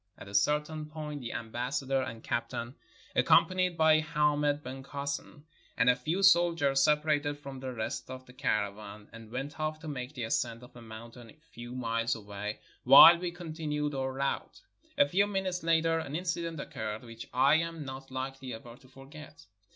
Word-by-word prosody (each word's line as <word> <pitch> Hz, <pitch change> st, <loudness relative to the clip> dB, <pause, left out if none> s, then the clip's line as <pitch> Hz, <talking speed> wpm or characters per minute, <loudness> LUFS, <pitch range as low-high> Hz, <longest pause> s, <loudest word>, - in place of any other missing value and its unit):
At -, -, -11 dB
a 100 Hz, -, -11 dB
certain 150 Hz, +8 st, +1 dB
point 150 Hz, -2 st, -6 dB
the 120 Hz, -, -5 dB
ambassador 130 Hz, +4 st, -2 dB
and 115 Hz, -4 st, -6 dB
captain, 120 Hz, +1 st, -3 dB, 0.4 s
accompanied 185 Hz, -2 st, +3 dB
by 160 Hz, -1 st, +5 dB
Hamed 150 Hz, -1 st, +1 dB
ben 130 Hz, +1 st, -7 dB
Kasen 140 Hz, +1 st, -5 dB, 0.3 s
and 125 Hz, -, +5 dB
a -, -, 0 dB
few 160 Hz, +10 st, -2 dB
soldiers, 165 Hz, -7 st, +4 dB
separated 150 Hz, -1 st, +2 dB
from 140 Hz, -2 st, -9 dB
the 130 Hz, 0 st, -5 dB
rest 110 Hz, 0 st, -4 dB
of 130 Hz, 0 st, -8 dB
the 125 Hz, -, -15 dB
caravan 105 Hz, -3 st, -3 dB
and 115 Hz, -1 st, -11 dB
went 135 Hz, +5 st, -5 dB
off 155 Hz, 0 st, -2 dB
to 160 Hz, -, -8 dB
make 135 Hz, -1 st, -5 dB
the 125 Hz, -, -4 dB
ascent 115 Hz, +1 st, -1 dB
of 125 Hz, -, -15 dB
a 120 Hz, -, -11 dB
mountain 115 Hz, +1 st, -11 dB
a -, -, -15 dB, 0.2 s
few 120 Hz, +1 st, -9 dB
miles 115 Hz, -2 st, -1 dB
away, 105 Hz, -1 st, -6 dB, 0.2 s
while 170 Hz, 0 st, +10 dB
we 180 Hz, 0 st, -2 dB
continued 155 Hz, -4 st, -4 dB
our 130 Hz, -1 st, -2 dB
route. 135 Hz, -, -3 dB, 0.4 s
A 285 Hz, -, +5 dB
few 200 Hz, +3 st, +2 dB
minutes 190 Hz, -3 st, -2 dB
later 165 Hz, 0 st, +2 dB
an 145 Hz, -2 st, -5 dB
incident 170 Hz, -2 st, -3 dB
occurred 110 Hz, -4 st, -5 dB
which 115 Hz, -1 st, -10 dB
I 135 Hz, +4 st, +4 dB
am 165 Hz, -2 st, -3 dB
not 135 Hz, 0 st, -8 dB
likely 130 Hz, -1 st, -5 dB
ever 115 Hz, +1 st, -11 dB
to 130 Hz, -, -20 dB
forget. 145 Hz, +4 st, -13 dB
140 Hz, 175 wpm, -30 LUFS, 120-155 Hz, 0.4 s, while